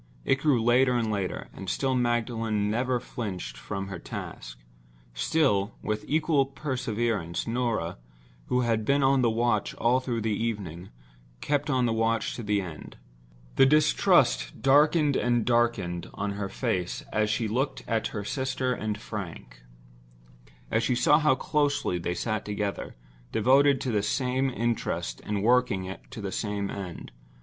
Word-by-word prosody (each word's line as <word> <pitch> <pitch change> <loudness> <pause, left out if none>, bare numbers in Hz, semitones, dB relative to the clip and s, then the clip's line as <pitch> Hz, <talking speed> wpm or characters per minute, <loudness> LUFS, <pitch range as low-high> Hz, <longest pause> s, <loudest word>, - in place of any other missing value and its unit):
It 135 - +2
grew 140 -4 +3
later 125 +2 +4
and 115 -2 0
later; 100 -3 -3
and 95 - -7
still 135 -1 0
Magdalen 115 -4 0
never 125 +2 0
flinched 95 - -5
from 95 +9 -5
her 95 -3 -6
task—still, - - -3
with 105 0 -2
equal 155 -2 +2
perseverance, 120 - -2
Norah, 115 - -1 0.5
who 125 - +2
had 115 -2 +1
been 140 +4 +2
on 135 0 +4
the 120 - +3
watch 115 -2 0
all 120 +3 +2
through 120 -3 -3
the 110 0 -1
evening, 95 -6 -4 0.5
kept 145 - -1
on 130 -3 +2
the 115 - +1
watch 115 -1 0
to - - -5
the 105 -2 0
end. 85 -5 -9 0.6
The 135 - +7
distrust 150 - +3
darkened 145 +1 +4
and 120 -2 +1
darkened 120 -8 0
on 105 - -2
her 100 -1 -4
face 90 -2 -2
as 110 -1 +2
she 110 +2 0
looked 130 +6 -1
at 115 -2 0
her 105 - -5
sister 130 +2 -1
and 105 -3 -3
Frank; 85 - -7 1.1
as 115 - +2
she 125 +2 +1
saw 150 +5 +4
how 150 -3 +4
close 145 +1 0
they 90 0 -1
sat 110 +2 -2
together, 105 -2 -3 0.4
devoted 135 +5 +4
to 130 - -1
the 105 -2 +1
same 130 +5 0
interest 115 - -2
and 105 -1 -2
working 105 -6 +2
to 130 -4 -8
the 100 -1 -4
same 100 0 -2
end. 95 -9 -7
115 Hz, 150 wpm, -27 LUFS, 100-130 Hz, 1.1 s, The